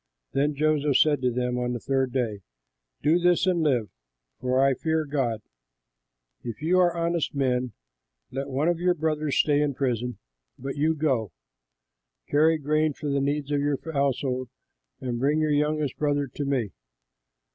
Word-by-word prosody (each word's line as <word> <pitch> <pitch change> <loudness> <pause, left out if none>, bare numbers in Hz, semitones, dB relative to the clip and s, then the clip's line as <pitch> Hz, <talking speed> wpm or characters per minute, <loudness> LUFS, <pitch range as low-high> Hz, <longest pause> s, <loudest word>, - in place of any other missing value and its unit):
Then 145 +2 +1
Joseph 150 -2 +2
said 145 -3 +3
to 125 - +2
them 125 0 -1
on 125 0 -1
the 120 - -3
third 135 +1 0
day, 115 -6 -2 0.6
"Do 160 +4 +4
this 175 0 +3
and 180 -2 +2
live, 125 -9 +1 0.5
for 130 0 +1
I 135 0 +4
fear 160 +3 -1
God: 125 -7 -1 1.0
if 115 -3 -6
you 180 +3 +3
are 175 -1 +3
honest 170 -2 -1
men, 125 -3 0 0.6
let 135 +2 -4
one 140 +4 0
of 175 -1 +1
your 180 0 +2
brothers 155 -2 -1
stay 145 -1 +3
in 145 -2 0
prison, 125 -4 -1 0.4
but 135 +1 -5
you 155 +2 +1
go, 130 - 0 0.9
carry 160 +2 +4
grain 155 +1 +1
for 145 +1 -4
the 140 0 +1
needs 145 +1 -1
of 145 - +2
your 145 -1 +1 0.2
households 130 -3 0 0.5
and 120 -2 -3
bring 145 +4 +2
your 155 -1 +1
youngest 150 -1 0
brother 145 -1 +1
to 140 +2 -5
me. 130 -7 -1
140 Hz, 165 wpm, -26 LUFS, 130-155 Hz, 1.0 s, Do